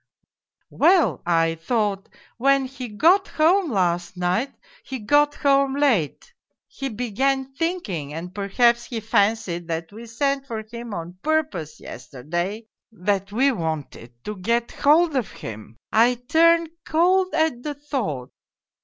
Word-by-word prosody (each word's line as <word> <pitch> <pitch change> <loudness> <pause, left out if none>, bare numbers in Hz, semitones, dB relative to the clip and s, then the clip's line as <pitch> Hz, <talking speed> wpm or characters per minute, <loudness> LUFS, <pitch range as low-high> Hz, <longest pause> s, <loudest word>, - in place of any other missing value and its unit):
Well, 355 -2 +3
I 165 -1 +3
thought, 205 -1 -1 0.3
when 275 +2 +3
he 260 -1 -7
got 335 - +3
home 340 +3 +2
last 175 -4 0
night, 180 +10 0 0.3
he 265 - -5
got 290 +6 +2
home 275 -1 +2
late, 280 - 0 0.3
he 270 - -5
began 265 +4 -1
thinking 270 - -3
and 170 +4 -7
perhaps 235 +4 +2
he 235 -3 -4
fancied 200 -5 0
that 165 +1 -4
we 225 +3 -10
sent 275 +3 -1
for 220 -3 -4
him 235 0 -8
on 175 +2 -7
purpose, 300 - -1
yesterday, 175 - -5 0.3
that 200 -1 -2
we 265 +6 +3
wanted 155 - -4
to 210 -1 -5
get 235 +5 0
hold 315 +2 +3
of 250 -5 0
him. 110 +1 -9
I 235 +3 +4
turned 330 +6 +3
cold 365 +4 +2
at 315 -6 +1
the 295 +2 -4
thought 250 - -4
235 Hz, 135 wpm, -23 LUFS, 180-280 Hz, 0.3 s, I